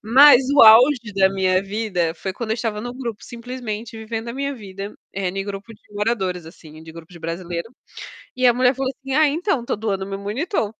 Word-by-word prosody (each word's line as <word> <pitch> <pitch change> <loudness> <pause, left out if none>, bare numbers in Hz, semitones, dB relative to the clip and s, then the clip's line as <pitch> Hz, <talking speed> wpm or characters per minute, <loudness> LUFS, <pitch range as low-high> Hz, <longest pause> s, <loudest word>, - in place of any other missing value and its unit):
Mas 265 +5 +7
o 285 - +7
auge 230 +1 +6
da 190 -1 +4
minha 185 -1 +1
vida 195 -5 -2
foi 190 +1 -5
quando 220 +2 -6
eu - - +1
estava 220 -2 -3
no 245 +2 -6
grupo 235 -5 -6
simplesmente 235 -2 -7
vivendo 225 +1 -5
a - - -4
minha 280 +1 -2
vida, 200 -3 -8 0.2
eh, 190 -2 -2
no 195 +1 -3
grupo 200 +2 -7
de - - -25
moradores, 200 -5 -2
assim, 160 -2 -14
de 160 - -11
grupo 165 +1 -13
de 170 - -13
brasileiro, 170 +4 -5 0.7
e 255 - +3
a 245 - +6
mulher 255 +1 +3
falou 265 0 -2
assim: 270 -1 -6
"Ah, 310 +1 +5
então, 315 - -1
tô - - -1
doando 200 -3 -3
meu 195 0 -5
monitor". 225 - -2
215 Hz, 210 wpm, -21 LUFS, 190-245 Hz, 0.7 s, Mas